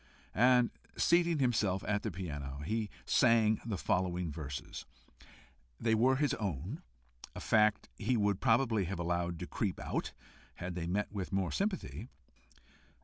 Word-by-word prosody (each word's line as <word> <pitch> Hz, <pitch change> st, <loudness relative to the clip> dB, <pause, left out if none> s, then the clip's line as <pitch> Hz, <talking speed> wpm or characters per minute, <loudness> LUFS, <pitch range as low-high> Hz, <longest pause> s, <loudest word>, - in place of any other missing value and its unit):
And 125 Hz, +2 st, +4 dB, 0.3 s
seating 170 Hz, -1 st, +3 dB
himself 110 Hz, -8 st, +1 dB
at 105 Hz, -1 st, +1 dB
the 110 Hz, -, -2 dB
piano, 70 Hz, -7 st, -5 dB
he 110 Hz, +2 st, -1 dB, 0.2 s
sang 115 Hz, -3 st, +4 dB
the 110 Hz, -4 st, -3 dB
following 90 Hz, -2 st, 0 dB
verses. 70 Hz, -3 st, -6 dB, 1.0 s
They 115 Hz, -1 st, +2 dB
were 125 Hz, +4 st, +4 dB
his 145 Hz, +2 st, +1 dB
own, 95 Hz, -11 st, -3 dB, 0.5 s
a -, -, -5 dB
fact 105 Hz, -1 st, +3 dB
he 125 Hz, -, +1 dB
would 100 Hz, -2 st, +1 dB
probably 115 Hz, -4 st, +3 dB
have 95 Hz, +2 st, -3 dB
allowed 85 Hz, 0 st, -1 dB
to -, -, -5 dB
creep -, -, -2 dB
out, -, -, -3 dB, 0.4 s
had 90 Hz, +1 st, -5 dB
they 85 Hz, -1 st, -4 dB
met 100 Hz, +4 st, -1 dB
with 100 Hz, -3 st, -4 dB
more 95 Hz, -1 st, 0 dB
sympathy. 185 Hz, -, -2 dB
105 Hz, 145 wpm, -33 LUFS, 90-115 Hz, 1.0 s, And